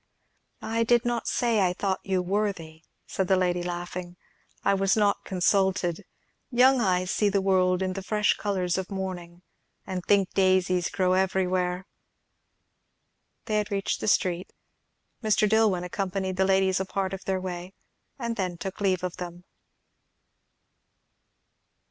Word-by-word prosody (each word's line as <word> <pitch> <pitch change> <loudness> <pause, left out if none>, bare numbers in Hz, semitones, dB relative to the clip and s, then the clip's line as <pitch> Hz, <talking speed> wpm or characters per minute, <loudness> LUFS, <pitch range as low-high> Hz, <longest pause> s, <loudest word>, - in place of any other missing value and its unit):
"I 230 +1 0
did 240 +1 +3
not 240 -1 -1
say 235 -3 +1
I 180 -2 +2
thought 190 0 -1
you 190 -2 0
worthy," 180 -5 -3 0.2
said 190 - -2
the 190 - +4
lady, 180 -1 +1
laughing; 175 0 -5 0.5
"I 200 - +3
was 195 +1 +2
not 205 -1 +2
consulted. 190 -1 +1 0.4
Young 255 +1 +5
eyes 185 -3 +1
see 210 - +2
the 200 0 +1
world 185 -1 +2
in 185 0 -1
the 195 - -5
fresh 210 +2 +2
colours 190 -3 -1
of 190 - -5
morning, 180 -3 -6 0.4
and 185 -1 -4
think 195 -1 +2
daisies 185 -2 +2
grow 185 -1 +1
everywhere." 185 -1 0 1.6
They 215 -2 0
had 210 0 -3
reached 200 -1 -2
the - - -3
street. 180 -3 +1 0.7
Mr. 215 -1 +2
Dillwyn 210 -4 +3
accompanied 190 0 -3
the 190 - +3
ladies 190 -1 +2
a 190 - -1
part 195 0 -2
of 195 - -7
their 190 -1 0
way, 180 0 -6 0.4
and 235 -3 -3
then 180 -3 -2
took 190 +3 -6
leave 185 -3 +1
of 180 -1 -4
them. 175 -1 -7
190 Hz, 145 wpm, -26 LUFS, 180-200 Hz, 1.6 s, Young